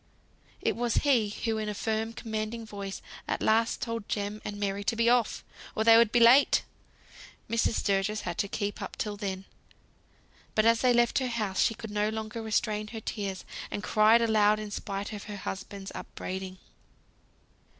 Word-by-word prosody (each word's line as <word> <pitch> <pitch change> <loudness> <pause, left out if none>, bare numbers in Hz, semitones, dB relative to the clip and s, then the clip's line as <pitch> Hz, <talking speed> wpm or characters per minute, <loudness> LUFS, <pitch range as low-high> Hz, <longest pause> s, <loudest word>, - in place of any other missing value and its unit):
It - - +1
was 240 0 0
he 240 -7 +3
who 220 +1 -2
in 215 -1 -2
a 210 - -4
firm 220 +2 -1
commanding 220 +1 -4
voice 200 -2 -6 0.2
at - - -2
last 225 +1 +2
told 230 -3 -4
Jem 205 +1 -2
and 205 -1 -5
Mary 200 0 -1
to 230 - +1
be 230 +1 +2
off, 245 -3 +1 0.3
or 220 - +1
they 225 0 +8
would 230 -1 +5
be 240 - +3
too 235 - +7
late. 260 +5 +6 0.8
Mrs. 230 0 +1
Sturgis 200 +1 0
had - - -4
kept 205 0 -2
up - - -6
till 210 -1 -3
then; 195 -2 -4 1.1
but 215 - +3
as 230 0 +4
they 255 - +4
left 240 +1 +3
her 260 - -1
house, 215 -5 -1
she 225 - +2
could 220 -1 -8
no 210 0 +1
longer 220 +1 -4
restrain 215 -1 -1
her 225 +1 -6
tears, 200 -3 -4 0.2
and 205 - -4
cried 220 +2 +5
aloud 215 -2 +4
in 210 -1 -6
spite 200 +1 -4
of 205 - -7
her 210 -1 -6
husband's 195 0 -6
upbraiding. 190 0 -6
215 Hz, 180 wpm, -29 LUFS, 205-230 Hz, 1.1 s, they